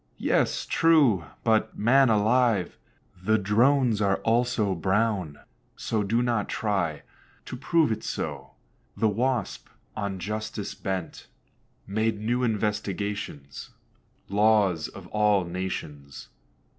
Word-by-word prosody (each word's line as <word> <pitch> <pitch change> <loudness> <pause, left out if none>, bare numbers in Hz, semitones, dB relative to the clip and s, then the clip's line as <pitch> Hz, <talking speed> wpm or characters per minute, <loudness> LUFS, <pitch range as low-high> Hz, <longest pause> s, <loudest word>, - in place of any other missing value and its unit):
"Yes, - - 0
true; 145 - +3 0.2
but, 110 0 +1
man 130 +4 +4
alive, 110 -2 +2 0.5
The 110 +3 +3
Drones 115 +3 +2
are 100 -1 +2
also 115 -3 +1
brown; 95 -3 0 0.4
so 110 - -2
do 115 +4 +1
not 115 -4 -1
try 95 -9 -1 0.4
To - - -7
prove 155 +3 +1
it 110 - -3
so." 70 -2 -5 0.4
The 110 - +2
Wasp, 120 +1 -1 0.3
on 100 -2 -3
justice 105 +2 -5
bent, 95 -3 -5 0.6
Made 110 +2 -1
new 120 +4 -1
investigations 105 - -3 0.6
(Laws 100 -5 +2
of - - -12
all 105 -3 +2
nations). 85 -6 -6
105 Hz, 105 wpm, -26 LUFS, 95-115 Hz, 0.6 s, man